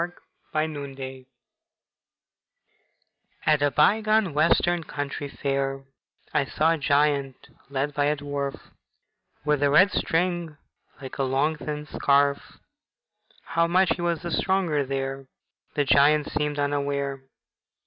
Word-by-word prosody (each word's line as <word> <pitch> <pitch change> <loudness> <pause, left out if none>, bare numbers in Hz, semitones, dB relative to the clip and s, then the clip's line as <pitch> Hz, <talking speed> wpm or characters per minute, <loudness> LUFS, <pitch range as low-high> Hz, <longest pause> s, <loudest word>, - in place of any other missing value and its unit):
AT 175 - -1 0.5
A - - -1
COUNTRY 140 -3 -7
FAIR 130 -1 -8 2.2
At 150 -2 +3
a 145 - +3
bygone 215 +4 +3
Western 170 +3 +2
country 145 -1 -5
fair 135 -1 -2 0.5
I 150 - +3
saw 155 +4 +1
a 165 - 0
giant 140 -2 +2 0.3
led 140 +1 -2
by 145 0 +1
a 150 +1 +1
dwarf 140 -1 -4 0.9
With 150 -1 +1
a 145 - +3
red 185 +8 +6
string 170 -2 -1 0.4
like 135 0 -9
a - - +2
long 135 +4 +1
thin 150 0 -5
scarf; 140 -1 +1 0.9
How 170 0 +1
much 185 +2 +3
he 175 - -7
was 170 -2 -1
the 170 - -4
stronger 175 -6 +1
there 135 0 -4 0.5
The 145 - +1
giant 145 +2 +4
seemed 150 -1 -1
unaware. 140 -1 -1
145 Hz, 130 wpm, -25 LUFS, 140-160 Hz, 2.2 s, red